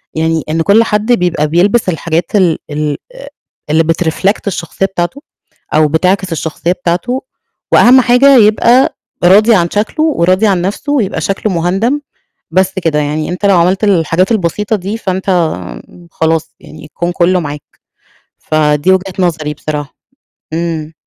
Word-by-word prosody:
يعني 160 0 0
إن 165 +1 0
كل 200 +7 +4
حد 215 +1 -1
بيبقى 175 -9 +1
بيلبس 190 +7 +2
الحاجات 170 +1 -2
ال 180 -5 +3
ال 150 0 -2 0.2
آآ، - - -11 0.4
اللي 160 +2 +3
بتreflect 165 +5 0
الشخصية 180 0 -2
بتاعته، 195 +8 -3 0.5
أو 155 0 +4
بتعكس 185 +4 0
الشخصية 165 +2 -2
بتاعته. 185 +9 -2 0.5
وأهم 255 +2 +6
حاجة 255 +2 +5
يبقى 235 +4 +4 0.3
راضي 210 +6 +5
عن 170 -3 +1
شكله 220 +9 -1
وراضي 185 - +2
عن 190 -4 +1
نَفسه 205 +10 -3
ويبقى 200 - -1
شكله 195 +3 -2
مُهندَم. 195 - 0 0.5
بس 190 +2 +1
كده، 155 -2 +1
يعني 150 +1 -2
أنت 180 +3 -3
لو 200 -2 +4
عملت 180 +4 +1
الحاجات 185 0 +1
البسيطة 210 +2 0
دي 200 +2 -4
فأنت 190 -3 -3 0.8
خلاص 160 0 -1
يعني 155 -1 -13
الكون 175 +3 -4
كله 180 +1 +1
معاك. 145 -3 -5 0.8
فدي 150 +3 +1
وجهة 190 0 -1
نظري 160 -4 -1
بصراحة. 150 -1 -5 0.6
امم. 160 -1 -3
180 Hz, 140 wpm, -13 LUFS, 160-205 Hz, 0.8 s, وأهم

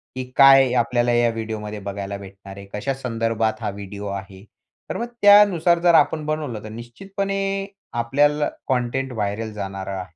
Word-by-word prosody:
की 130 - -3
काय 135 -2 +7
आपल्याला 120 +1 +1
ह्या 120 0 +3
व्हिडिओ 110 -1 -5
मध्ये 105 0 -6
बघायला 100 0 -5
भेटणार 100 0 -12
आहे. 100 - -9
कशा 105 +7 -2
संदर्भात 115 -3 -2
हा 110 - -2
व्हिडिओ 100 +1 -7
आहे. 100 -1 -7 0.5
तर - - -3
मग 235 - -2 0.2
त्यानुसार 200 -5 +6
जर 170 0 +4
आपण 155 -1 +3
बनवलं, 150 -8 -3
तर 110 - -8
निश्चितपणे 195 - -5 0.6
आपल्याला 145 +4 +2 0.2
कंटेंट 130 +1 -1
व्हायरल 110 0 -3
जाणार 95 -2 -6
आहे. 95 -4 -6
115 Hz, 160 wpm, -22 LUFS, 100-135 Hz, 0.6 s, काय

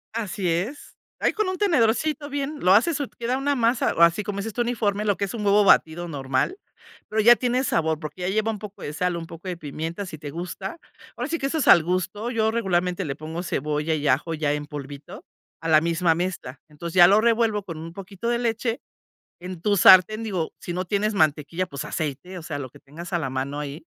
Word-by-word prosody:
Así 205 -4 -2
es. 185 - -3 0.2
Ahí - - +1
con 430 -2 0
un 370 - -3
tenedorcito 300 - +1
bien, 285 +1 -3
lo 185 - +4
haces, 290 +9 +3
y 285 - -2
queda 240 +2 -1
una 285 +1 0
masa, 235 -1 +1
o - - 0
así 170 +5 +5
como 200 0 -4
dices 220 +2 -4
tú, 240 - -1
uniforme, 215 -4 0
lo 205 -2 +2
que 200 - 0
es 195 - -7
un 225 -3 -4
huevo 205 +1 +4
batido 175 -2 +3
normal, 135 - -1 0.5
pero 220 - 0
ya 235 +3 +8
tiene 250 +1 0
sabor, 160 - 0
porque 155 +3 -8
ya 180 - -1
lleva 215 +3 +1
un 215 - -6
poco 205 -1 -10
de 145 - -5
sal, 180 +3 -1
un 165 -1 -6
poco 165 +3 -10
de 180 - -3
pimienta, 165 +5 -5
si 165 - -7
te 145 -1 -8
gusta. 180 - -6 0.4
Ahora - - -3
sí 335 +2 -1
que 275 - -2
eso 315 +4 -1
es 300 - +1
al 170 - +8
gusto, 185 +6 -2
yo 220 -2 +1
regularmente 185 -4 0
le 140 -3 -4
pongo 160 +3 -6
cebolla 150 -1 -1
y 150 -1 -2
ajo 140 +5 +1
ya 150 -2 0
en 150 0 -3
polvito 145 0 -9 0.4
a 165 - -5
la 155 -1 +6
misma 165 +1 +2
mezcla, 165 -6 -4
entonces 165 +3 -7
ya 175 -1 +9
lo 205 +3 +5
revuelvo 225 -2 +2
con 165 -4 -7
un 165 +1 -8
poquito 195 +4 -6
de 240 0 +1
leche. 230 0 -1 0.6
En 180 -1 -7
tu 205 -1 +2
sartén, 190 +4 +7
digo, 185 -7 -2
si 175 - -5
no 180 +1 -2
tienes 210 +3 0
mantequilla, 155 +1 +1
pues 140 -1 -6
aceite, 160 +4 -4
o - - -9
sea, 155 -2 -5
lo 135 -2 -5
que - - -17
tengas 170 +6 -10
a 175 - +2
la 135 -5 -3
mano 135 +2 -3
ahí, 150 +2 -6
185 Hz, 235 wpm, -24 LUFS, 160-220 Hz, 0.6 s, ya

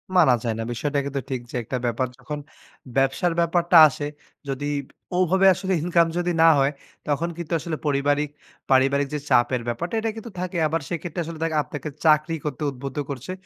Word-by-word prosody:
মানা 130 -8 +6
যায় 115 -2 0
না। - - -1
বিষয়টা 145 +4 -1
কিন্তু 140 -1 -3
ঠিক 130 -2 -2
যে - - -7
একটা 125 - -3
ব্যাপার। 120 +2 0
যখন 145 +3 -6 0.6
ব্যবসার 135 +6 +2
ব্যাপারটা 170 +1 +3
আসে, 145 +1 -4 0.4
যদি 135 +1 -3 0.5
ওভাবে 190 +2 +4
আসলে 190 +1 -2
ইনকাম 170 -1 +3
যদি 175 0 0
না - - +8
হয় 135 +1 +3 0.4
তখন 150 +4 0
কিন্তু 170 -1 -5
আসলে 155 0 -4
পরিবারিক 145 +1 +1 0.4
পারিবারিক 135 +2 +4
যে 150 - -1
চাপের 120 0 +3
ব্যাপারটা 170 - -3
এটা 225 0 -1
কিন্তু 225 0 -8
থাকে 180 -1 -3 0.3
সেক্ষেত্রে 175 0 -4
আসলে 160 0 -7
দেক 165 - 0
আপনাকে 150 +1 -6 0.2
চাকরি 155 +1 +4
করতে 145 -1 -4
উদ্বুদ্ধ 135 +3 -7
করছে। 140 +6 -5
150 Hz, 175 wpm, -24 LUFS, 135-170 Hz, 0.6 s, না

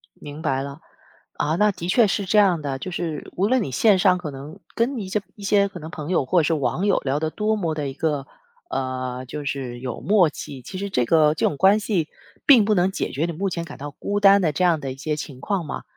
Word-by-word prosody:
明 145 +2 -9
白 135 -4 0
了， 140 +2 -7 0.5
啊， 155 +2 -1
那 210 +3 +3
的 180 -3 -6
确 225 +3 +5
是 200 0 -1
这 210 +3 +1
样 185 -6 +3
的， 135 -2 -3
就 185 - -6
是 165 -4 -4
无 195 +3 +1
论 255 0 +2
你 135 - -5
线 195 - +4
上 180 -1 +4
可 160 -5 -6
能 140 +3 -10 0.2
跟 240 +2 0
一 190 - -5
些 210 +2 0
一 205 - -12
些 200 0 +3
可 185 -3 -9
能 155 - -8
朋 155 -2 -6
友 180 -7 +1
或 175 +7 +3
者 - - -1
是 165 - +1
网 155 +6 -1
友 200 - +3
聊 140 +1 -1
得 160 0 -1
多 215 +4 0
么 165 -6 -2
的 150 -2 -3
一 135 - -7
个， 145 -3 -1 0.4
呃， 130 - -3
就 145 +3 -6
是 130 -3 -4
有 125 -2 -5
默 195 -6 +4
契， 135 -3 -8
其 185 - -8
实 200 +1 -4
这 125 -10 +1
个 155 0 +4
这 - - 0
种 145 - 0
关 195 +5 +5
系 190 -7 -1 0.4
并 255 -8 +7
不 215 - +2
能 185 +1 +2
解 - - -3
决 145 +6 -1
你 170 - -3
目 195 +4 -2
前 170 -1 -4
感 - - -10
到 145 +1 -7
孤 205 +8 -3
单 200 -1 +6
的 160 - +2
这 150 +5 -1
样 170 -3 +3
的 135 -2 -5
一 - - -14
些 150 +2 -2
情 145 -3 -7
况 195 -5 -1
嘛。 150 - -6
165 Hz, 285 characters per minute, -23 LUFS, 145-200 Hz, 0.5 s, 并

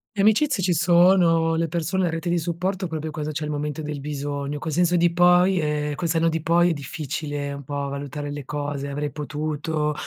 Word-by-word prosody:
Le 200 - +1
amicizie 220 +1 +3
ci 180 0 +2
sono, 170 0 +4
le 165 +1 0
persone, 170 +3 -1
la - - +1
rete 165 +2 -3
di 175 0 +2
supporto, 180 +3 -2
proprio 160 -1 -4
cosa 150 0 -4
c'è 155 +1 -4
al 150 - -3
momento 150 +1 -3
del 150 -1 -4
bisogno, 145 0 -4
col 155 +2 -4
senso 175 +3 +2
di 170 0 +3
poi 180 +2 +5
ehm, 150 -1 -1
col 170 +4 -2
senno 165 0 +2
di 165 0 -2
poi 170 +2 +3
è - - +1
difficile 145 0 -4
un 140 0 -7
po' 140 +1 -3
valutare 145 +1 -5
le 145 0 -5
cose, 145 0 -4
"avrei 145 +1 -3
potuto", 150 +1 -2
155 Hz, 210 wpm, -24 LUFS, 145-175 Hz, -, poi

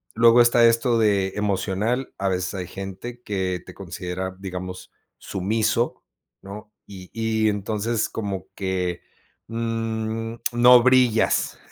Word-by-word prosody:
Luego 115 +1 +6
está 120 0 +5
esto 115 +1 +3
de 100 -3 +2
emocional, 105 +5 -1
a 100 - 0
veces 90 0 -2
hay 90 -2 -5
gente 95 +6 -8
que 95 -4 -2
te 90 - -11
considera, 95 0 -5
digamos, 90 -1 -7 0.3
sumiso, 110 +5 -1 0.4
¿no?, 105 +2 -9 0.2
y 95 -2 -11
y 110 -1 0
entonces 105 +2 -1
como 100 -4 -4
que, 90 -2 -2 0.5
mm, 115 0 -3 0.2
no 120 0 +7
brillas, 125 -3 +3
105 Hz, 120 wpm, -23 LUFS, 95-115 Hz, 0.5 s, no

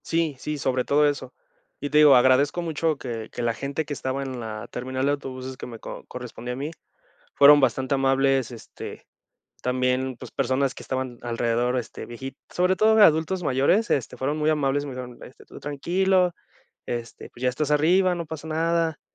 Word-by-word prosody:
Sí, 165 -3 0
sí, 150 +2 -4
sobre 130 -2 0
todo 145 +3 +3
eso. 145 -1 -3 0.5
Y 145 - -4
te 150 - +4
digo, 150 -3 +8
agradezco 130 +6 +4
mucho 160 -2 -1
que 115 -4 -6
que - - -5
la 115 -1 +1
gente 140 +5 -3
que 145 - -4
estaba 135 0 -3
en 130 -2 -5
la 110 -2 -6
terminal 130 +2 -3
de 140 - +3
autobuses 130 -2 -5
que - - -7
me 115 -2 -9
co - - -8
correspondía 125 -1 -7
a - - -5
mí, 145 +4 -4 0.6
fueron 145 +1 +8
bastante 130 0 +1
amables, 135 -2 +2
este, 115 - -9 0.6
también, 130 0 0
pues - - -10
personas 135 0 0
que - - -10
estaban 130 -2 -3
alrededor, 120 +1 0
este, 120 - -7
vieji 130 +3 -8
sobre 180 +1 +1
todo 220 +2 +4
de 220 - +6
adultos 160 +3 +3
mayores, 145 - +2
este, 125 -2 0
fueron 140 +5 -2
muy 155 0 +2
amables, 145 -2 +1
me 140 - -6
dijeron, 125 -1 -8
este: 130 - -15
"Tú - - -12
tranquilo, 180 +5 +1 0.5
este, 120 -1 -5
pues 120 - -14
ya 130 - +3
estás 140 +4 -2
arriba, 180 +5 +4
no 170 -1 -4
pasa 160 0 -7
nada". 165 0 0
135 Hz, 190 wpm, -25 LUFS, 125-155 Hz, 0.6 s, digo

